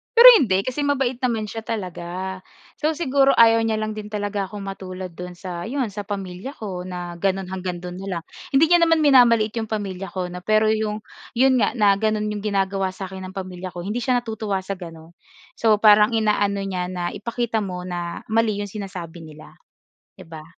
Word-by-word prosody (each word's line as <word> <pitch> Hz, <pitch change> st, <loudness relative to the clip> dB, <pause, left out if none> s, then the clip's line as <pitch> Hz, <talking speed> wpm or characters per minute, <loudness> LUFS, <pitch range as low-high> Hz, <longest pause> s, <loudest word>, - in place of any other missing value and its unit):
Pero 485 Hz, +2 st, +12 dB
hindi. 195 Hz, -6 st, +2 dB
Kasi 255 Hz, +5 st, -4 dB
mabait 265 Hz, -3 st, 0 dB
naman 235 Hz, -4 st, 0 dB
siya 215 Hz, +2 st, -5 dB
talaga. 190 Hz, -4 st, -5 dB, 0.4 s
So 310 Hz, +1 st, 0 dB
siguro 275 Hz, -3 st, +3 dB
ayaw 230 Hz, 0 st, +6 dB
niya 220 Hz, -, +1 dB
lang 215 Hz, 0 st, -2 dB
din 215 Hz, -1 st, -6 dB
talaga 205 Hz, -1 st, -3 dB
akong 205 Hz, +1 st, -8 dB
matulad 185 Hz, -2 st, -6 dB
do'n 180 Hz, +1 st, -8 dB
sa, 175 Hz, -1 st, -6 dB
'yon 255 Hz, -3 st, -2 dB
sa 200 Hz, 0 st, -7 dB
pamilya 195 Hz, +6 st, -5 dB
ko 185 Hz, -4 st, -6 dB
na 175 Hz, -1 st, -6 dB
gano'n 190 Hz, 0 st, -1 dB
hanggang 180 Hz, -2 st, -4 dB
do'n 180 Hz, 0 st, -6 dB
na 195 Hz, -, -7 dB
lang. -, -, -17 dB, 0.3 s
Hindi 320 Hz, +4 st, +5 dB
niya 350 Hz, -, +7 dB
naman 330 Hz, -2 st, +4 dB
minamaliit 235 Hz, -6 st, +5 dB
'yong 220 Hz, -, -3 dB
pamilya 195 Hz, -3 st, -4 dB
ko 180 Hz, 0 st, -4 dB
'no. 180 Hz, -, -6 dB
Pero 215 Hz, 0 st, +4 dB
'yong, 215 Hz, -1 st, -2 dB, 0.3 s
'yon 260 Hz, +1 st, +4 dB
nga -, -, +1 dB
na 210 Hz, -4 st, +5 dB
gano'n 215 Hz, 0 st, 0 dB
'yong 210 Hz, -, -3 dB
ginagawa 195 Hz, -1 st, 0 dB
sa 190 Hz, -1 st, -7 dB
akin 190 Hz, 0 st, -7 dB
ng 190 Hz, -, -12 dB
pamilya 185 Hz, -1 st, -6 dB
ko 175 Hz, -, -5 dB
hindi 210 Hz, +6 st, -2 dB
siya 245 Hz, -1 st, +1 dB
natutuwa 215 Hz, -4 st, -3 dB
sa 195 Hz, 0 st, -5 dB
gano'n. 165 Hz, -2 st, -10 dB, 0.5 s
So 220 Hz, -2 st, +5 dB
parang 210 Hz, +1 st, +6 dB
inaano 205 Hz, -2 st, +1 dB
niya 185 Hz, -2 st, -3 dB
na, 180 Hz, -1 st, -3 dB
"Ipakita 235 Hz, +1 st, -2 dB
mo 180 Hz, -3 st, -4 dB
na, 175 Hz, -1 st, -5 dB
mali 225 Hz, -1 st, +2 dB
'yong 200 Hz, -, -7 dB
sinasabi 180 Hz, -5 st, -7 dB
nila", 155 Hz, -1 st, -12 dB, 0.6 s
'di -, -, -12 dB
ba? 160 Hz, -1 st, -10 dB
200 Hz, 200 wpm, -22 LUFS, 185-225 Hz, 0.6 s, Pero